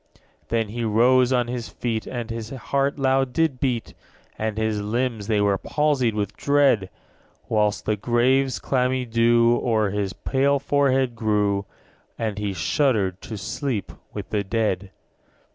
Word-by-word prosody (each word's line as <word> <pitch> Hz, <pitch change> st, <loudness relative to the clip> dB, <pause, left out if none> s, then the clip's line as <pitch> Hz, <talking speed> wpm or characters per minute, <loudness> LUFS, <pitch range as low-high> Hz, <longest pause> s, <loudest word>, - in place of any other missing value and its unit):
10. -, -, -28 dB, 0.3 s
Then 115 Hz, -1 st, 0 dB
he 120 Hz, +2 st, -4 dB
rose 120 Hz, +4 st, +4 dB
on 125 Hz, -2 st, +2 dB
his 120 Hz, -1 st, -4 dB
feet, 115 Hz, -3 st, -3 dB
And 120 Hz, -2 st, -5 dB
his 115 Hz, -1 st, -5 dB
heart 140 Hz, +2 st, -1 dB
loud 135 Hz, -1 st, +2 dB
did 160 Hz, -5 st, +1 dB
beat, 125 Hz, -5 st, -1 dB, 0.4 s
And 110 Hz, -1 st, -3 dB
his 110 Hz, -1 st, 0 dB
limbs 115 Hz, 0 st, -2 dB
they 110 Hz, -2 st, +2 dB
were 100 Hz, -2 st, +2 dB
palsied 140 Hz, -7 st, +1 dB
with 105 Hz, -2 st, -2 dB
dread; 140 Hz, -9 st, +2 dB, 0.5 s
_55 -, -, -33 dB
Whilst 105 Hz, -1 st, +1 dB
the 110 Hz, -, +1 dB
grave's 125 Hz, +4 st, +2 dB
clammy 130 Hz, -1 st, 0 dB
dew 115 Hz, 0 st, +3 dB
O'er 110 Hz, -4 st, +1 dB
his 100 Hz, -1 st, -2 dB
pale 140 Hz, +1 st, +1 dB
forehead 135 Hz, -3 st, +1 dB
grew; 105 Hz, -3 st, 0 dB, 0.5 s
And 110 Hz, -3 st, -3 dB
he 105 Hz, -1 st, -2 dB
shuddered 95 Hz, -, 0 dB
to 110 Hz, -, -7 dB
sleep 110 Hz, -, -3 dB, 0.2 s
with -, -, -7 dB
the 105 Hz, -1 st, 0 dB
dead. 100 Hz, -2 st, -1 dB
115 Hz, 155 wpm, -23 LUFS, 105-130 Hz, 0.5 s, rose